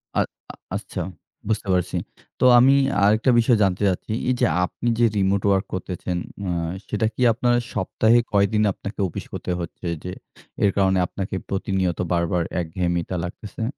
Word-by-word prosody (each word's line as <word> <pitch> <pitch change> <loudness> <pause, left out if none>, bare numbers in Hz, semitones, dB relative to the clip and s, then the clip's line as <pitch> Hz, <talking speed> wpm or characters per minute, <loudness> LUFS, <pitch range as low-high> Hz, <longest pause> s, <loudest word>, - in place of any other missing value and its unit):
আ - - +3 0.3
আ - - -17 0.2
আচ্ছা, - - -4 0.5
বুঝতে 110 -2 -1
পারছি। 90 0 0 0.4
তো - - +3
আমি 130 +3 +6 0.3
আরেকটা 110 +5 +4
বিষয় 115 0 +4
জানতে 95 0 +1
চাচ্ছি। 95 +3 -3 0.2
এই - - +4
যে, - - +4 0.2
আপনি 120 - -6
যে, 120 - +5
remote 100 0 +1
work 95 0 +2
করতেছেন, 90 -1 -3 0.3
আ - - -1 0.4
সেটা 105 +1 0
কি - - -5
আপনার 120 +1 +2 0.2
সপ্তাহে 110 +4 +3
কয়দিন 105 +1 +3
আপনাকে 100 +3 -8
অফিস 85 - -7
করতে - - -4
হচ্ছে 85 +1 -6 0.2
যে, 90 - -5 0.5
এর 100 - +5
কারণে 95 -1 +3
আপনাকে 95 0 -5
প্রতিনিয়ত 95 -2 -1
বারবার 85 0 +1 0.2
একঘেয়েমিতা 85 +1 -2
লাগতেছে? 95 +4 -6
95 Hz, 155 wpm, -23 LUFS, 90-110 Hz, 0.5 s, আমি